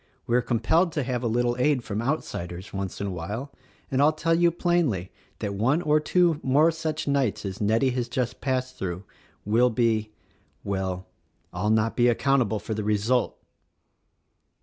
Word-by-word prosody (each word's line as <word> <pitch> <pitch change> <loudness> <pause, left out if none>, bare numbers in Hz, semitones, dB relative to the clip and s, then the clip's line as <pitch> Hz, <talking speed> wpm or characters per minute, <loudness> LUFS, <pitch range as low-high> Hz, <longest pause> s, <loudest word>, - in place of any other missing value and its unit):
We 120 - +1
are 125 - +4
compelled 160 +10 +2
to 150 - -1
have 125 -1 -2
a 120 - -1
little 120 +1 +1
aid 130 -1 +2
from 105 0 -3
outsiders, 95 - -4
once 95 -1 -4
in 100 - -2
a 100 - -3
while; 105 - -5 0.4
and 135 +1 +2
I'll 150 +2 +6
tell 155 +2 0
you 170 +1 +4
plainly 165 - 0 0.3
that 100 - -3
one 120 +10 +2
or 150 -1 +3
two 170 0 +2
more 145 +5 +4
such 160 -2 -3
nights 125 -7 0
as 95 +1 -5
Nettie 115 +5 +2
has 125 -1 -2
just 120 -3 -2
passed 130 -1 -2
through 90 0 -4 0.4
will 115 +4 +4
be 110 -2 +1 0.3
— - - -40
well, 95 -2 -3 0.3
— - - -42
I'll 95 +4 -1
not 110 +1 +2
be 120 0 +4
account 135 +3 +3
able 110 -2 0
for 105 +2 -5
the 105 0 -3
result!" 105 +4 +1
120 Hz, 185 wpm, -26 LUFS, 105-140 Hz, 0.4 s, I'll